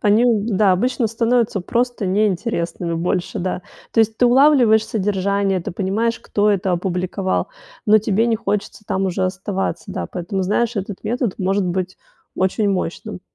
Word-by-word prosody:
Они, 210 +3 +4
да, 210 -3 +3
обычно 245 +5 +1
становятся 230 -2 +1
просто 240 +1 -1
неинтересными 185 -3 -1
больше, 175 +1 -2
да. 180 0 -3 0.3
То 225 - +4
есть 220 0 +1
ты 245 - +4
улавливаешь 245 -4 +5
содержание, 200 -2 0
ты 200 - -5
понимаешь, 205 +5 -1
кто 210 0 +1
это 190 -2 0
опубликовал, 185 +2 -1 0.4
но 215 +1 +6
тебе 215 +2 +1
не 230 -1 +2
хочется 210 -1 -3
там 190 0 0
уже 185 +1 -1
оставаться. 190 +1 -3
Да, - - -3
поэтому, 185 +2 -3
знаешь, 230 +5 0
этот 200 -1 -5
метод 240 -2 -1
может 195 +1 +1
быть 185 +1 -2 0.4
очень 190 +3 +1
мощным. 190 -2 -3
200 Hz, 155 wpm, -20 LUFS, 185-225 Hz, 0.4 s, но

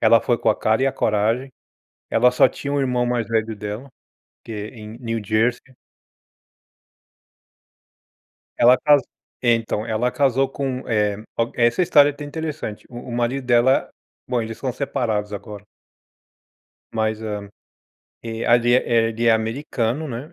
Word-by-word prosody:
Ela 115 0 +5
foi 120 -2 0
com - - 0
a 110 - +3
cara 110 +3 +1
e 135 - +3
a 135 - +1
coragem. 115 +3 0 0.6
Ela 125 +2 +4
só 125 - +5
tinha 140 - -6
o 145 - +1
irmão 125 -2 0
mais 120 -2 -1
velho 110 -1 0
dela, 105 +5 -6 0.5
que 115 - -9 0.2
em 110 -2 -10
New 115 -2 -3
Jersey. 120 +5 0 2.8
Ela 125 +2 +6
caso 145 -3 +4 0.4
então, 115 -3 +1
ela 115 +2 0
casou 135 -1 +2
com, 135 -1 -4
eh, 105 -2 +1 0.2
o 115 0 0
essa 120 +7 +2
história 145 -4 +5
é - - -2
até 145 - -9
interessante, 150 -7 -5
o 120 -1 -8
o - - -6
marido 120 +3 -1
dela 125 +2 +3 0.4
bom, 125 -1 0
eles 115 0 -6
são 130 - -2
separados 110 -6 -2
agora. 105 0 -8 1.3
Mas 110 0 -1
é. 105 -2 -5 0.7
E 115 0 -5
ali, 120 +1 +4
eh 130 - +4
eh, 115 -1 +3
ele 115 +1 -2
é 115 - +6
americano, 120 +4 -1
né, 135 +7 -7
120 Hz, 155 wpm, -22 LUFS, 110-130 Hz, 2.8 s, Ela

